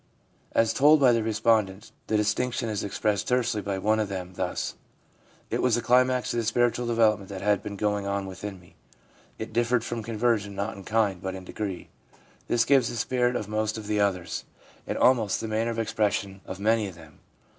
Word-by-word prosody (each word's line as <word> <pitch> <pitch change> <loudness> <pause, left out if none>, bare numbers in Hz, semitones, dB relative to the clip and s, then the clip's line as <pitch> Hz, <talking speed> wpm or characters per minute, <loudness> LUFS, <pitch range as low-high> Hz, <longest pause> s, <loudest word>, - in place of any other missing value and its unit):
As 115 0 +3
told 150 +3 +6
by 130 -3 +6
the 115 -1 +2
respondents, 110 -3 +1 0.2
the 110 - +2
distinction 115 +3 0
is 105 -2 -2
ex 100 - -4
pressed 105 -1 0
tersely 120 -4 +1
by 100 -1 -3
one 110 +3 +1
of 105 -2 -1
them 95 -2 -5
thus: 90 0 -3 0.8
'It - - 0
was 125 -3 +3
the 120 - 0
climax 125 +1 +3
of 120 - 0
the - - 0
spiritual 120 +1 +1
development 110 -4 +2
that 95 -1 -6
had 105 -1 +2
been 100 - -6
going 105 0 -1
on 100 0 -1
within 95 +1 -7
me. 90 - -20 0.6
It 110 - -6
differed 120 0 +2
from 120 -1 -4
conversion 110 -2 0
not 100 +3 -3
in 100 -1 -11
kind, 105 -5 +1
but 95 0 -4
in 95 - -8
degree/ 95 0 -5 0.6
This 115 -1 +2
gives 135 -4 +4
the - - -5
spirit 125 +1 +1
of 105 - -2
most 110 +1 -1
of 110 - -7
the 105 0 0
others, 95 -4 -1 0.4
and - - -2
almost 115 -6 +3
the 110 - -4
manner 110 +2 0
of 115 - -3
expression 105 -3 -1
of 95 - -6
many 110 +1 +2
of 95 - -9
them. 80 -3 -16
110 Hz, 205 wpm, -27 LUFS, 100-115 Hz, 0.8 s, told